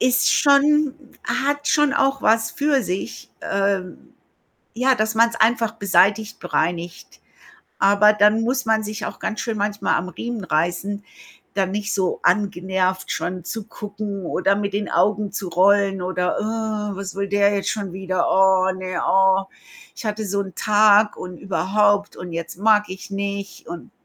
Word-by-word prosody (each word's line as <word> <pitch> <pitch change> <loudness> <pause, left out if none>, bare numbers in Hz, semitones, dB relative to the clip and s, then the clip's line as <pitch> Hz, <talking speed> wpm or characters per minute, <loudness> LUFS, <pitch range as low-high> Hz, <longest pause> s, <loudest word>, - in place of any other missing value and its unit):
Ist 255 0 +3
schon 290 0 +4 0.3
hat 285 +1 -1
schon 295 -2 +3
auch 275 0 +1
was 225 +1 +2
für 285 -3 +1
sich, 185 0 -5
ähm, 195 -2 -2 0.6
ja, 255 +2 +2
dass 215 0 0
man's 230 +1 +3
einfach 230 0 +2
beseitigt, 200 +3 +1
bereinigt. 175 0 -3 0.6
Aber 205 +2 +5
dann 210 +1 +3
muss 260 +3 -1
man 220 0 +2
sich 210 0 -5
auch - - -8
ganz 215 - -3
schön 225 -2 -3
manchmal 205 0 -1
am 180 - -2
Riemen 225 +4 -5
reißen, 175 +6 -2 0.5
da 195 - +2
nicht 205 +3 -3
so 190 -3 -1
angenervt 185 -1 0
schon 180 -1 -4
zu 220 -2 -5
gucken 205 -3 -6
oder 195 +3 +1
mit 200 -1 -2
den 205 +1 -3
Augen 210 0 +1
zu 195 -2 -4
rollen 195 +1 +2
oder: 180 0 -1
„Ah, 215 -1 -3
was 195 -1 -6
will 200 0 -3
der 200 +1 +2
jetzt 200 - -2
schon 200 -4 -4
wieder? 185 -1 -1
Oh, 190 0 +3
ne, 185 -1 -4
oh, 190 0 +3 0.5
ich - - -9
hatte 210 0 -3
so 200 +1 -1
'n 190 -3 -6
Tag 210 0 +4
und 180 -1 -8
überhaupt 205 +1 +1
und 175 -1 -8
jetzt 170 +1 -6
mag 210 0 +3
ich 190 +1 -9
nicht 200 0 -5
und" 170 0 -8
200 Hz, 160 wpm, -21 LUFS, 190-220 Hz, 0.6 s, Aber